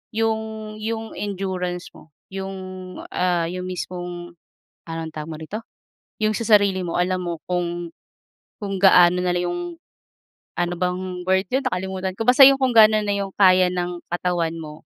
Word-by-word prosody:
yung 220 -1 -2
yung 225 0 -4
endurance 185 -3 -3
mo 155 - -16 0.2
yung 195 0 -5 0.6
ah, 175 -2 +1
yung 180 0 -5
mismong 175 -1 -6 0.5
anong 165 -1 -5
tawag 155 0 -5
mo - - -5
rito, 180 +7 -6 0.6
yung 215 - +3
sa 230 - -3
sarili 200 -4 +4
mo 170 - -4
alam 180 +1 0
mo 170 -2 -4
kung 175 -1 -2 0.7
kung 195 -1 -3
gaano 180 -2 +7
nalang 180 0 0
yung 350 - -3 1.0
ano 175 0 0
bang 180 0 -3
word 190 +1 +2
yun 265 - +2
nakalimutan 190 0 -2
ko, - - 0
basta 255 +2 +7
yung 275 0 +6
kung 260 -1 +2
gaano 215 -1 +7
na 205 -1 0
yung 200 -1 -3
kaya 185 -2 +6
ng 175 -1 -3
katawan 175 -2 0
mo. 155 -1 -9
185 Hz, 155 wpm, -22 LUFS, 175-205 Hz, 1.0 s, gaano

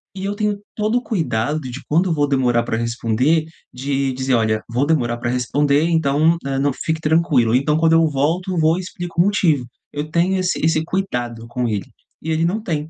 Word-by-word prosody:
e 190 - -5
eu 200 - -1
tenho 210 -1 -1 0.2
todo 215 +3 +1
o 245 - -2
cuidado 150 - -1
de 130 -1 -7
quando 175 +4 +2
vou 145 -2 +1
demorar 125 -4 +2
pra 115 -1 -2
responder 120 +7 +1 0.3
de 135 +1 -1
dizer: 130 0 -1
"Olha, 110 -2 +1
vou 125 +4 +1
demorar 120 -7 +1
pra 120 0 -3
responder, 140 +4 +1
então, 160 +1 +2
hã, 135 -1 -1
não 140 0 +2
fique 160 +4 -3
tranquilo.", 150 -8 +2
então, 150 +4 +2
quando 165 0 +3
eu 165 0 +5
volto, 165 +7 -1
vou 160 +2 +3
e - - -3
explico 175 -1 -3
o - - +3
motivo, 165 -10 +2 0.3
eu 145 +1 -4
tenho 175 +4 +1
esse 185 -1 0
esse 160 -1 +2
cuidado 120 -12 -3
com 125 0 -2
ele 105 -3 -2 0.4
e 160 - -3
ele 160 +1 +1
não 200 +6 -1
tem. 155 -6 -3
150 Hz, 205 wpm, -20 LUFS, 125-170 Hz, 0.4 s, eu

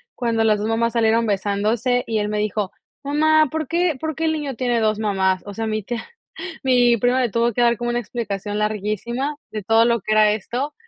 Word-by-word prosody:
cuando 230 -2 0
las 215 -1 +3
2 210 +2 -2
mamás 230 0 0
salieron 230 0 +2
besándose", 215 +5 0
y 220 -1 0
él 210 0 -1
me 210 - -2
dijo: 210 -2 -2 0.3
"Mamá, 310 +1 +3
¿por 315 -2 -3
qué 335 -1 0
por 315 +1 -3
qué 325 - -4
el 320 - +2
niño 295 -4 -3
tiene 245 -1 0
2 215 -1 +1
mamás?", 190 -3 +1
o 205 - -7
sea, 225 +2 -3
mi 215 -1 -2
tía 235 +3 -5 0.6
mi 245 -2 +4
prima 245 +3 +2
le 245 -3 +1
tuvo 235 +3 +1
que 245 - -2
dar 235 0 +4
como 240 +2 -3
una 240 - 0
explicación 205 -3 -4
larguísima, 215 +6 -2 0.2
de 215 -2 -5
todo 225 +3 +4
lo 235 0 +2
que 215 +3 -3
era 215 -1 +5
esto, 240 +7 -3
230 Hz, 220 wpm, -21 LUFS, 210-250 Hz, 0.6 s, era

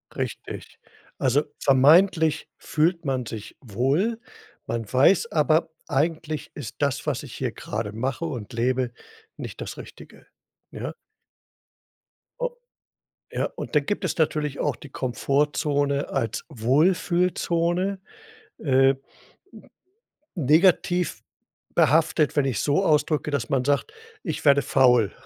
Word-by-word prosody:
Richtig. - - -6 0.4
Also, 135 +3 +2 0.2
vermeintlich 160 +4 +4
fühlt 165 +2 0
man 130 -3 -1
sich 110 -2 -8
wohl. 140 - 0 0.5
Man 115 -2 -4
weiß 165 - +4
aber: 160 +1 +2 0.2
„Eigentlich 155 +1 -1
ist 130 -7 -7
das, 140 -2 0
was - - -1
ich - - -10
hier - - -3
grade 105 -1 -5
mache 130 +8 -2
und 125 -7 -6
lebe, 125 +1 0 0.5
nicht - - -8
das - - -6
Richtige“, - - -13 0.5
ja? - - -5 1.5
O - - 0 0.8
ja, - - -1
und - - -6
dann 145 -1 +3
gibt 205 - -2
es - - -2
natürlich 150 -2 0
auch 145 -5 0
die 145 - -13
Komfortzone 140 +3 0
als 115 -5 -2
Wohlfühlzone. 175 - +1 0.6
Äh 135 -1 +3 1.4
negativ 175 +3 +3 0.5
behaftet, 155 0 +3
wenn 145 -2 +3
ich's 125 -6 -1
so 150 +7 +2
ausdrücke, 150 -2 +2
dass 140 -5 -2
man 130 -2 +1
sagt: 145 - 0 0.3
„Ich 160 -5 -4
werde 140 0 +6
faul.“ 120 -7 +4
145 Hz, 115 wpm, -24 LUFS, 130-165 Hz, 1.5 s, werde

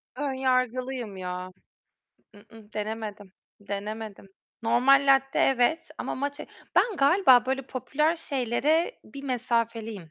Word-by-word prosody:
Ön 280 0 -2
yargılıyım 255 -4 -1
ya. 180 0 -5 0.9
I-ı. 210 +1 -17
Denemedim. 210 -2 -5 0.3
Denemedim. 205 +1 -6 0.4
Normal 270 +5 +4
latte 270 0 +3
evet 270 +5 +2
ama - - -3
matcha 285 +2 -4 0.3
ben 445 -5 +3
galiba 275 -5 +5
böyle 265 +1 -1
popüler 300 +6 0
şeylere 295 - 0
bir 275 - -10
mesafeliyim. 230 - -2
250 Hz, 105 wpm, -27 LUFS, 215-275 Hz, 0.9 s, galiba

